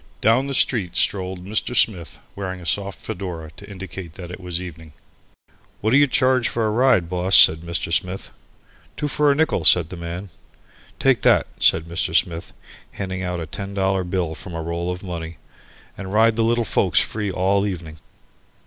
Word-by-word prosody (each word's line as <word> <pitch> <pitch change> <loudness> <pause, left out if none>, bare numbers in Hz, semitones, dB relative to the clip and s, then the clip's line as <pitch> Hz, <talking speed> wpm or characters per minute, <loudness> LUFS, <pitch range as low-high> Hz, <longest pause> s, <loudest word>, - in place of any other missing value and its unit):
Down 115 +5 +3
the 140 - -2
street 95 -11 +2
strolled 95 -1 -1
Mr. 110 +4 -1
Smith, 90 -9 +1 0.2
wearing 95 -2 -5
a 90 - -11
soft 100 0 -1
fedora 90 -7 -6
to 80 - -14
indicate 95 -4 -8
that 90 -2 -9
it 90 - -8
was 90 -2 -4
evening. 80 -4 -10 0.9
"What 110 - 0
d'you 145 +3 +5
charge 130 -1 +2
for 115 -2 -1
a 110 - +1
ride, 120 -6 +3
boss?" 90 +2 +4
said 80 - +7
Mr. 85 0 -3
Smith. 90 +3 -2 0.7
"Two 150 - -1
for 145 0 +2
a - - +2
nickel," 160 +2 +1
said 85 -3 +5
the - - -7
man. 85 +3 -6 0.7
"Take - - +2
that," - - +4
said 80 - +4
Mr. 85 +1 -3
Smith, 85 -1 0 0.4
handing 95 -1 -4
out 90 -1 -3
a 80 - -4
ten 100 +4 -7
dollar 95 -1 +1
bill 90 -2 -2
from 90 +1 -9
a 80 - -3
roll 85 +1 -3
of 90 +1 -7
money, 85 -3 -6 0.6
"and 95 -1 -7
ride 110 +2 +4
the 115 - +1
little 120 +1 +1
folks - - +2
free 105 -2 -1
all 95 +2 +1
evening." 80 -5 -6
95 Hz, 185 wpm, -22 LUFS, 85-105 Hz, 0.9 s, said